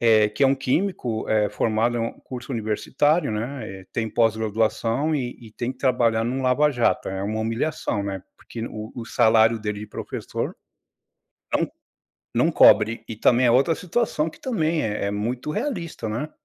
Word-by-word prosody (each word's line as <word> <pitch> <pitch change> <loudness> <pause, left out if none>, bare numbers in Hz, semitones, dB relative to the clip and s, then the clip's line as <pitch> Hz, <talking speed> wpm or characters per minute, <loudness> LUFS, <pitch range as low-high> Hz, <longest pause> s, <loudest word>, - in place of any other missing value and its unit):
eh, 110 -2 +5
que 120 +7 +1
é - - +7
um 135 - +4
químico, 135 - -1
eh, 105 -1 +3
formado 115 +3 +1
em - - -1
um 115 - -2
curso 125 +1 -7
universitário, 125 +7 +1
né, 110 -3 -5
eh, 95 - -17
tem 115 -1 -1
pós-graduação 115 +5 +1
e 125 -4 -3
e 115 -2 -12
tem 120 +3 -3
que - - -25
trabalhar 120 -4 +2
em 120 - -1
um 130 - -2
lava 135 +4 +3
jato. 120 -4 +1
É 95 0 -4
uma 110 +2 -2
humilhação, 115 -2 -1
né, 95 -2 -4
porque 115 -1 -7
o 110 -1 -7
o 120 - -6
salário 110 -1 +4
dele 105 -1 -4
de 105 - -7
professor, - - -5 1.0
não - - +1 0.7
não - - +3
cobre. 110 +2 +5
E 110 - -5
também 125 +3 +4
é 120 - +5
outra 135 +7 +4
situação 175 -3 -1
que - - -17
também 165 -10 0
é 105 -2 -1
é - - 0
muito 120 +7 -3
realista, 170 - -3
né. 120 +8 -3
115 Hz, 180 wpm, -24 LUFS, 110-135 Hz, 1.0 s, é